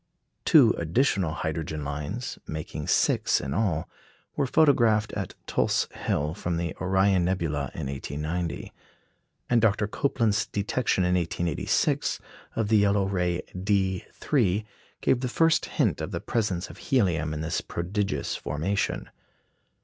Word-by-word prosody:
Two - - +7
additional 90 - +1
hydrogen 80 -1 -3
lines, 75 - -4
making 80 -1 -5
six - - +3
in 65 - -4
all, 90 -5 0 0.5
were 140 - +1
photographed 115 -8 +4
at 100 -2 -4
Tulse - - +1
Hill, 75 +2 -1
from 85 -2 -2
the 85 -1 -3
Orion 95 0 +3
nebula, 80 -7 -1
in - - -4
1890; 75 +4 -4 0.7
and 120 -2 +3
Dr. 105 -2 +3
Copeland's 110 -1 0
detection 105 -1 0
in 90 0 +2
1886 85 -2 0 0.4
of 110 -2 0
the 110 - +5
yellow 100 -1 +3
ray 90 -3 0
D_3 95 +3 0 0.4
gave 125 - +3
the 125 - -1
first 165 +5 +3
hint - - 0
of - - -3
the - - -3
presence 100 -4 -1
of - - -14
helium 85 - +1
in 75 0 -3
this 80 +1 -1
prodigious 95 +4 -2
formation. 80 +9 -2
95 Hz, 130 wpm, -27 LUFS, 80-105 Hz, 0.7 s, Two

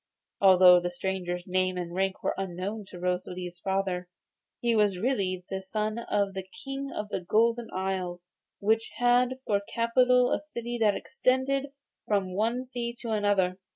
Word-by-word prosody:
Although 185 -2 +8
the 175 0 -2
stranger's 180 -1 -3
name 185 0 0
and 175 -1 -4
rank 190 +1 -1
were - - +1
unknown 195 +3 -4
to 180 - -10
Rosalie's 180 0 -3
father, 190 -1 -1 0.5
he 235 -1 +1
was 205 -3 +3
really 185 -5 -1
the 190 0 -2
son 215 +3 -2
of 205 -4 0
the 190 - -3 0.2
King 275 0 -4
of 210 0 -4
the 190 - -2
Golden 230 +5 +2
Isle, 185 -2 -2 0.4
which 220 +2 +1
had 245 +1 +3
for 200 -1 +1
capital 250 +2 +3
a - - +2
city 240 -5 -5
that 210 -2 +4
extended 265 +1 0 0.4
from 195 -3 0
one 230 +6 0
sea 240 -2 -4
to 230 - -4
another. 200 -3 +1
200 Hz, 155 wpm, -28 LUFS, 185-235 Hz, 0.5 s, Although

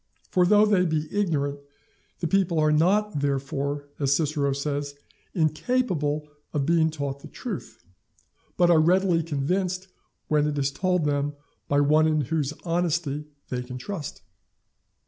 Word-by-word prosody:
For 180 -1 +4
though 210 +2 +6
they 200 -4 +3
be 155 -3 0
ignorant, 145 -8 0 0.6
the 170 - 0
people 185 -1 +2
are 155 0 +3
not 190 +4 +2
therefore, 140 +1 -2
as 140 -1 +3
Cicero 145 -2 0
says, 140 +1 -3 0.4
incapable 155 - 0 0.3
of 145 -2 0
being 165 0 +3
taught 140 -3 -4
the - - -11
truth, 215 - -7 0.7
but 175 -1 +5
are 165 - +6
readily 180 +1 +3
convinced 180 +5 -1 0.4
when 150 -1 +2
it 150 -1 -2
is 140 0 +1
told 180 +1 0
them 145 0 0 0.3
by 145 0 +3
one 155 +2 +4
in 155 -1 +2
whose 145 +1 -1
honesty 165 -4 -1 0.2
they 125 -1 -2
can 125 0 -7
trust. 160 +2 -6
155 Hz, 145 wpm, -26 LUFS, 145-180 Hz, 0.7 s, though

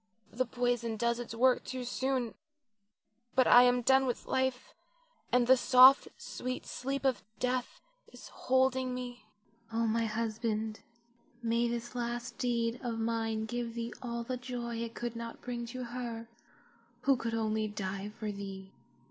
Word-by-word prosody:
The 255 +1 -1
poison 240 -2 0
does 235 +2 +1
its 235 -1 -6
work 255 +2 +4
too 255 -1 -5
soon; 250 -1 -1 1.0
but 255 -1 +5
I 245 - +9
am 245 0 +4
done 265 +2 +5
with 245 - -2
life, 260 -1 -1 0.6
and 250 -1 +4
the 260 +2 +7
soft, 255 +1 +7
sweet 255 0 -5
sleep 275 +2 -3
of 260 -2 +2 0.2
death 250 0 -1 0.3
is - - -12
holding 260 0 +1
me. 245 -3 -7 0.4
Oh, 230 +1 +1
my 230 +1 +1
husband, 220 0 -2 0.6
may 235 +1 +2
this 235 +1 -4
last 240 -1 -4
deed 235 -1 0
of 235 -3 -3
mine 225 -1 -1
give 235 0 -4
thee 235 0 -4
all 235 -1 -3
the 250 +2 -3
joy 240 -2 -4
it 230 0 -4
could 240 -1 -4
not 230 0 -6
bring 240 -1 -4
to 255 +2 -5
her 235 -1 -5 0.7
who 275 +1 +4
could 230 -2 -3
only 220 -1 0
die 200 -1 -4
for 210 0 -5
thee. 195 -1 -7
235 Hz, 155 wpm, -32 LUFS, 230-250 Hz, 1.0 s, I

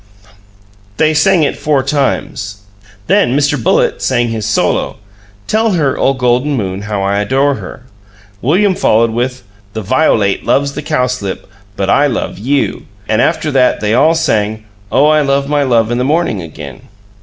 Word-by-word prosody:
They 155 0 +2
sang 160 +3 +3
it - - 0
four 145 -3 +1
times; 120 -8 -2 0.4
then 125 +4 +2
Mr. 145 0 +2
Bullitt - - +1
sang 120 -2 +1
his 110 -2 -3
solo, 110 - 0 0.5
"Tell 220 0 +1
her, 150 -6 +1
O 135 - +1
Golden 125 +3 +1
Moon, 95 -3 -3
how 100 -2 -1
I 100 +1 0
Adore 135 +7 +1
her," - - -10 0.6
William 185 - +2
following 115 -8 +2
with 125 +2 -2 0.3
"The 110 -1 -5
violate 105 -4 +1
loves 140 0 +1
the 150 - -5
cowslip, 125 -9 -2 0.3
but 95 - -2
I 145 +8 +3
love 125 - -3
YEW," 135 +6 -1 0.3
and 110 - +1
after 160 -2 0
that 130 -2 +2
they 105 0 0
all 155 +7 +4
sang, 110 -8 -1 0.3
"Oh, 145 - +4
I 155 0 +4
love 140 -1 0
my 145 0 +1
love 120 -4 +1
in 120 - 0
the - - +1
morning," 145 - 0
again. 75 -5 -9
130 Hz, 165 wpm, -14 LUFS, 110-145 Hz, 0.6 s, all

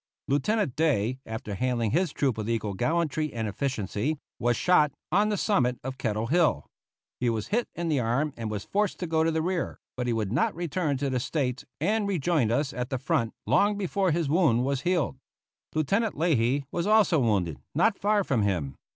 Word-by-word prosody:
Lieutenant 155 - +1
Day, 130 -6 +1
after 110 -2 -5
handling 120 0 0
his 175 +4 +1
troop 135 -5 0
with 110 +1 -4
equal 110 -3 -1
gallantry 155 - 0
and 115 -1 -3
efficiency, 120 +3 -2 0.2
was 120 0 +1
shot, 165 -5 +4 0.2
on 205 +5 +3
the 210 - 0
summit 125 - +1
of 130 +1 -5
Kettle 110 -1 -1
Hill. 160 +6 +2 0.5
He 125 - +1
was 110 -2 -2
hit 235 +3 +1
in 170 0 -3
the 150 -4 +1
arm 130 +6 0
and 115 -2 -4
was 105 -2 -4
forced 205 -1 0
to - - 0
go 160 -1 +1
to 165 - +2
the 160 -1 0
rear, 180 0 -2 0.2
but 125 -1 -2
he 120 - +1
would 110 -3 -1
not 140 +8 +1
return 165 -3 -1
to 140 0 -1
the 130 - 0
States, 130 -1 -2
and 205 +6 +1
rejoined 160 - +1
us 140 +2 0
at 125 0 -3
the 130 - -1
front 115 -3 -1
long 205 0 +3
before 195 -1 0
his 165 -1 0
wound 140 -6 +3
was 135 -1 -1
healed. 170 -6 0 0.6
Lieutenant 195 +8 +1
Leahy 140 -4 +2
was 175 +2 -1
also 210 -7 +4
wounded, 95 - +1 0.2
not 200 +6 +3
far 205 0 +2
from 130 - +1
him. 85 -10 -1
140 Hz, 195 wpm, -27 LUFS, 115-175 Hz, 0.6 s, shot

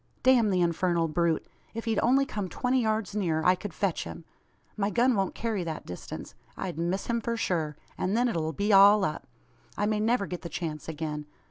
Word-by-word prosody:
"Damn 250 -4 +5
the 185 -2 +2
infernal 170 0 +1
brute! 165 0 0 0.3
If 230 - -4
he'd 225 -2 +1
only 270 +4 +4
come 205 -7 -4
twenty 255 +5 +1
yards 215 -3 -1
nearer, 165 -6 0
I 180 - +7
could 190 +2 -6
fetch 185 +1 -1
him. 165 - -9 0.5
My 205 -1 0
gun 245 +4 +3
won't 195 -2 -1
carry 220 -5 -2
that 160 -2 -5
distance. 90 - -8 0.2
I'd 175 -4 -4
miss 175 +3 -1
him 235 -1 -1
for 230 +1 -2
sure, 160 -8 -1 0.2
and 195 +4 0
then 245 +1 +3
it'll 160 -8 -1
be 200 +7 0
all 200 +1 +7
up. 155 - -4 0.5
I 205 - +1
may 215 0 +1
never 220 -1 +2
get 180 -2 -6
the 170 - -6
chance 155 -1 -5
again. 150 -1 -4
195 Hz, 205 wpm, -28 LUFS, 165-220 Hz, 0.5 s, I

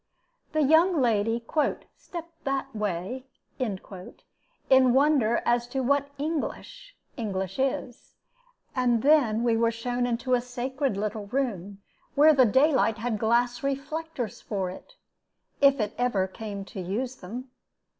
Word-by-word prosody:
The 310 -1 +2
young 320 +4 +4
lady 230 -1 +1 0.5
"stepped 335 -2 -10
that 270 -2 -2
way" 210 +5 -3 0.3
in 215 -7 -2 0.9
wonder 260 -2 +4
as 240 0 +2
to 265 +2 -2
what 280 +2 +1
English 330 - -4 0.2
English 195 -3 -3
is, 260 -2 -3 0.6
and 245 -3 +2
then 260 -7 +4
we 235 -1 +3
were 230 0 +3
shown 245 +2 -2
into 245 +2 -1
a 245 - +3
sacred 255 0 -2
little 210 0 -3
room, 200 -6 -3 0.3
where 305 +2 +7
the 265 -3 +5
daylight 260 -2 +3
had 225 -1 -2
glass 240 +2 +1
reflectors 275 -3 -4
for 190 -4 -3
it, - - -13 0.7
if 280 -1 +5
it 215 -1 -1
ever 240 -7 +1
came 200 0 -7
to 195 - -7
use 240 +8 -3
them. 245 +8 -8
245 Hz, 130 wpm, -27 LUFS, 215-275 Hz, 0.9 s, where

